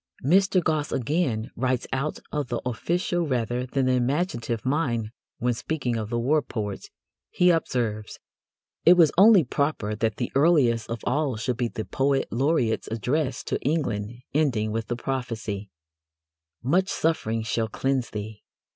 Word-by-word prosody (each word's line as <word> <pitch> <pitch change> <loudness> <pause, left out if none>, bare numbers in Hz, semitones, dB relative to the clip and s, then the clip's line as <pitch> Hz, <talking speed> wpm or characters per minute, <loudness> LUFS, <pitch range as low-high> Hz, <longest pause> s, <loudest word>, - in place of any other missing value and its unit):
Mr. 185 +3 +4
Gosse 155 -2 0
again 125 -4 -1
writes 130 0 0
out 135 +3 -1
of 150 -3 -2
the 120 0 -2
official 170 - -1
rather 125 -1 -1
than 135 +1 0
the 130 - +2
imaginative 125 - -1
mind 125 -6 0 0.3
when, 120 +1 0
speaking 130 -1 -2
of 110 -2 -3
the 120 - -1
war 145 +6 +2
poets, 105 -7 -5 0.4
he 180 0 +4
observes: 115 -10 -1 0.7
It 175 - +8
was 165 -4 +5
only 200 -1 +7
proper 140 -5 -1
that 110 0 -1
the 120 - -3
earliest 135 -7 +3
of 115 -1 -4
all 140 0 0
should 120 +2 -2
be 120 -2 0
the 110 -1 -5
Poet 135 0 +1
Laureate's 125 -3 +1
address 125 +5 -1
to - - -2
England, 115 -9 -1 0.2
ending 125 -8 +1
with 115 0 -3
the 120 - -2
prophecy: 115 -6 -4 0.9
Much 180 +9 +2
suffering 115 -9 0
shall 115 0 -1
cleanse 135 +3 -1
thee! 105 0 -6
125 Hz, 150 wpm, -25 LUFS, 115-150 Hz, 0.9 s, It